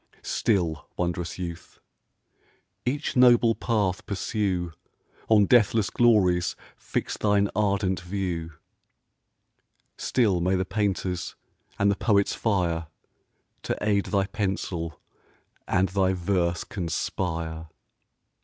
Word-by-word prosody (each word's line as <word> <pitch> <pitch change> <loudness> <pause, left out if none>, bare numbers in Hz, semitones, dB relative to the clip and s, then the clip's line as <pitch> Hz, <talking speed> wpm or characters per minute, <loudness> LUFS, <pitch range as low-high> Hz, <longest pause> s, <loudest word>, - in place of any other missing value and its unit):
Still, 85 -8 0
wond'rous 85 -1 -2
youth! 85 -2 -7 1.1
each 140 +4 -1
noble 120 -2 +6
path 105 -6 -1
pursue, 95 -4 -1 0.6
On 105 -2 +6
deathless 110 -2 +3
glories 95 -7 +3 0.2
fix - - -3
thine 100 -1 +2
ardent 100 -2 +1
view: 90 -3 -4 1.5
Still 105 -8 +2
may 90 +2 +2
the 95 0 0
painter's 95 -4 -2 0.4
and 100 0 +3
the - - 0
poet's 100 -1 +2
fire 85 -7 0 0.7
To - - -2
aid 100 -2 +1
thy 100 -2 +1
pencil, 95 -5 -3 0.7
and 95 0 +2
thy 95 0 +2
verse 90 -1 0
conspire! 80 -2 -3
95 Hz, 100 wpm, -26 LUFS, 90-105 Hz, 1.5 s, noble